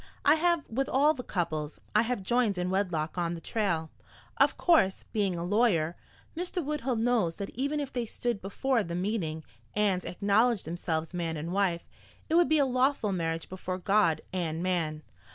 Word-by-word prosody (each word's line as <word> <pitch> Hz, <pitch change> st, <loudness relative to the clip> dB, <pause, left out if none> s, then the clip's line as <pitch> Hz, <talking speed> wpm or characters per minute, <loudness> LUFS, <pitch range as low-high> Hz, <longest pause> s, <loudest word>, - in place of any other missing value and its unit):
I -, -, +7 dB
have 335 Hz, -1 st, +1 dB
with 270 Hz, +4 st, -1 dB
all 290 Hz, +4 st, +4 dB
the 260 Hz, -, -6 dB
couples 160 Hz, -8 st, -3 dB, 0.2 s
I 210 Hz, -, +6 dB
have 235 Hz, -3 st, -2 dB
joined 235 Hz, -2 st, +1 dB
in 180 Hz, +1 st, -1 dB
wedlock 180 Hz, -4 st, -1 dB
on 170 Hz, 0 st, -1 dB
the -, -, -7 dB
trail. 165 Hz, -5 st, -1 dB, 0.5 s
Of -, -, +4 dB
course, 255 Hz, -, +3 dB
being 200 Hz, -4 st, +1 dB
a 170 Hz, -, -3 dB
lawyer, 180 Hz, -5 st, +2 dB, 0.4 s
Mr. 355 Hz, -1 st, -3 dB
Woodhull 280 Hz, -4 st, -1 dB
knows 225 Hz, -7 st, +1 dB
that 200 Hz, -, -5 dB
even 280 Hz, +4 st, -1 dB
if 285 Hz, -2 st, -4 dB
they 245 Hz, -2 st, -2 dB
stood 235 Hz, -1 st, -2 dB
before 240 Hz, +6 st, 0 dB
the 170 Hz, -4 st, -4 dB
meeting 175 Hz, -5 st, -2 dB, 0.3 s
and 200 Hz, -3 st, +2 dB
acknowledged 205 Hz, +4 st, +2 dB
themselves 165 Hz, 0 st, -3 dB
man 165 Hz, -2 st, -2 dB
and 165 Hz, +4 st, -4 dB
wife 190 Hz, -4 st, 0 dB, 0.4 s
it -, -, +2 dB
would 345 Hz, 0 st, +5 dB
be 315 Hz, -, +4 dB
a 285 Hz, -, +4 dB
lawful 255 Hz, -4 st, +1 dB
marriage 165 Hz, -3 st, -2 dB
before 185 Hz, 0 st, -4 dB
God 195 Hz, -3 st, +2 dB
and 170 Hz, -2 st, -2 dB
man. 160 Hz, -4 st, -1 dB
195 Hz, 180 wpm, -29 LUFS, 170-245 Hz, 0.5 s, I